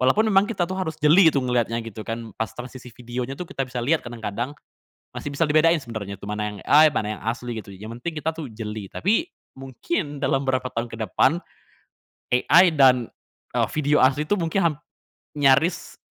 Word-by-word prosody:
walaupun 170 +13 +3
memang 195 +1 +5
kita 190 -6 0
tuh 185 - -3
harus 160 -4 -3
jeli 160 +4 +6
gitu 140 - +1
ngeliatnya 120 -2 0
gitu 110 -1 -8
kan, 115 -1 -5
pas 115 - -2
transisi 125 0 -9
video-nya 125 +2 -5
tuh 180 - -4
kita 135 - -3
bisa 125 -1 -5
lihat 155 +5 +2
kadang-kadang, 120 +1 -4 0.6
masih - - -5
bisa 140 - +1
dibedain 165 +2 +4
sebenarnya 110 -6 -6
tuh 100 - -9
mana 105 0 -2
yang - - -10
AI, 155 +1 +7
mana 105 - -1
yang - - -15
asli 120 +1 -3
gitu 105 -2 -8
yang 105 +3 -9
penting 160 +2 -4
kita 160 - 0
tuh 160 -2 -6
jeli. 110 -1 -6
Tapi, 225 - +1 0.3
mungkin 145 - -4
dalam 135 -1 +1
berapa 130 -1 0
tahun 115 +1 -1
ke 115 - -7
depan, 170 - +2 1.0
AI 160 +8 +6
dan 130 -4 +4 0.5
eee, - - +1
video 150 -1 +2
asli 135 +3 +3
itu 205 - +2
mungkin 170 +2 0
ham - - -9 0.6
nyaris 145 +5 +2
130 Hz, 190 wpm, -23 LUFS, 115-155 Hz, 1.0 s, AI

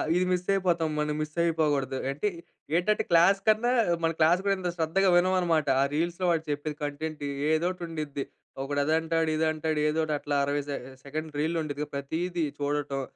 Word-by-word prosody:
ఇది 180 +1 +2
మిస్ 180 0 0
అయిపోతాం. 175 -4 +1
మనం 150 0 0
మిస్ 155 0 -5
అయిపోకూడదు. 145 -5 +1
అంటే 150 +9 -2 0.5
ఏంటంటే 195 +5 +2
క్లాస్ 175 +4 +6
కన్నా, 220 +3 +4 0.3
మన 165 - +3
క్లాస్ 165 +3 +5
కూడా 200 - +3
ఎంత 180 -1 -2
శ్రద్ధగా 175 +4 +2
వినమనమాట. 175 -4 +2
ఆ - - +5
రీల్స్‌లో 170 +4 -1
వాడు 165 -2 +1
చెప్పేది 145 +1 -2
కంటెంట్, 150 +1 -4 0.3
ఏదో 160 +2 +2
ఒకటి 180 -1 -8
ఉండిద్ది. 150 -4 -4 0.4
ఒకడు 145 +1 -2
అదంటాడు, 160 +1 +1
ఇది 160 +1 +1
అంటాడు, 155 0 -1
ఏదో 155 +1 -1
ఒకటి 155 -1 -1
అట్లా 145 0 -2
60 145 +1 0
సె 140 - -1 0.3
సెకండ్ 155 +3 -5
రీల్ 160 +3 0
ఉండిద్ది. 150 -1 -3
ప్రతీదీ 165 +5 -2 0.2
చూడటం 145 -1 -1
160 Hz, 175 wpm, -28 LUFS, 150-175 Hz, 0.5 s, క్లాస్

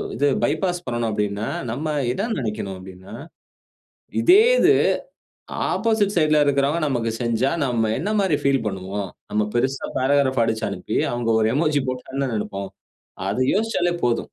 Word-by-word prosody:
இது 145 - +2 0.2
பைபாஸ் 175 +4 0
பண்ணணும் 120 -2 -1
அப்படின்னா, 105 0 -2 0.2
நம்ம 140 +7 -4 0.3
எதா 195 - -2
நெனைக்கணும் 105 -4 -4
அப்பிடின்னா, 95 +1 -12 1.1
இதே 380 +5 +7 0.2
இது - - +6 1.0
ஆப்போசிட் 220 -3 +1
சைட் 155 -2 +3
ல - - +5
இருக்கிறவன் 145 +3 +1
நமக்கு 120 -5 -1
செஞ்சா 120 +3 +1
நம்ம 115 -4 0
என்னமாரி 195 -2 +1
ஃபீல் 135 -3 +2
பண்ணுவோம். 95 0 -4 0.2
நம்ம 105 0 +1
பெருசா 130 +3 0
பாராகிராப் 130 -2 +2
அடிச்சு 110 0 -1
அனுப்பி, - - -4 0.2
அவுங்க 120 -1 -1
ஒரு 110 - +3
எமோஜி 150 -1 +2
போட்டா 125 -1 -4
என்ன 135 -1 0
நெனைப்போம். 100 -2 -4 0.6
அது 115 +6 0
யோசிச்சாலே 205 -5 0
போதும். 120 -1 +2
130 Hz, 140 wpm, -22 LUFS, 110-155 Hz, 1.1 s, இதே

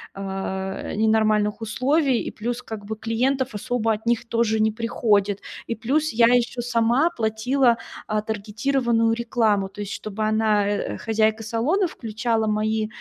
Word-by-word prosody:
э, 190 0 -4
ни 215 +2 +1
нормальных 215 -1 +2
условий? 260 +4 +1
И - - -5
плюс, 240 +3 -4
как 215 -2 -7
бы, 220 +2 -4
клиентов 250 +4 -1
особо 225 +1 -1
от 215 +2 -6
них 235 0 +1
тоже 220 -2 +1
не 220 0 +3
приходит. 210 -3 +1 0.3
И 230 - -2
плюс 290 +8 0
я 230 +1 +5
ещё 245 +1 +2
сама 240 +6 +2
платила, 235 +1 +1 0.3
а, 215 -1 0
таргетированную 225 +2 0
рекламу, 225 -4 +1
то 205 +2 -9
есть 205 - -5
чтобы 215 0 -4
она, 215 -1 +2
э, 205 0 -2
хозяйка 220 -1 +1
салона, 270 - +1
включала 225 -3 -2
мои, 215 0 0
225 Hz, 150 wpm, -23 LUFS, 215-240 Hz, 0.3 s, я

